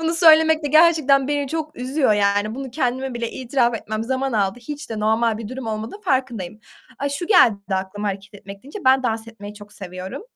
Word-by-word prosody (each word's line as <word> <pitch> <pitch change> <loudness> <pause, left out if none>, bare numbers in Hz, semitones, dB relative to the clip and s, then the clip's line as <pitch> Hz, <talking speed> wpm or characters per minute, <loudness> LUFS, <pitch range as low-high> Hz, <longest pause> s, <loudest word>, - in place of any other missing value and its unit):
Bunu 325 +1 0
söylemek 320 -2 +5
de - - 0
gerçekten 300 -3 +4
beni 285 -2 -1
çok 310 0 -4
üzüyor, 260 -1 +1
yani, 205 +1 +1
bunu 270 0 -6
kendime 260 -1 -2
bile 235 -1 -3
itiraf 245 -2 0
etmem 215 0 -4
zaman 265 +1 -2
aldı, 200 0 0
hiç 290 +2 -8
de 220 - -4
normal 220 +1 +1
bir 225 - -7
durum 255 0 -7
olmadığının 220 - -5
farkındayım. 245 - -2 0.4
Aaa, 280 - -1
şu 285 +5 -4
geldi 355 - +6
bir - - -4
de - - +3
aklıma 205 +2 -4
hareket 200 +2 -7
etmek 200 0 -11
deyince 290 +10 -9
ben 260 0 +5
dans 225 -2 -2
etmeyi 210 -2 -10
çok 205 0 -14
seviyorum. 185 - -8
240 Hz, 210 wpm, -21 LUFS, 210-280 Hz, 0.4 s, geldi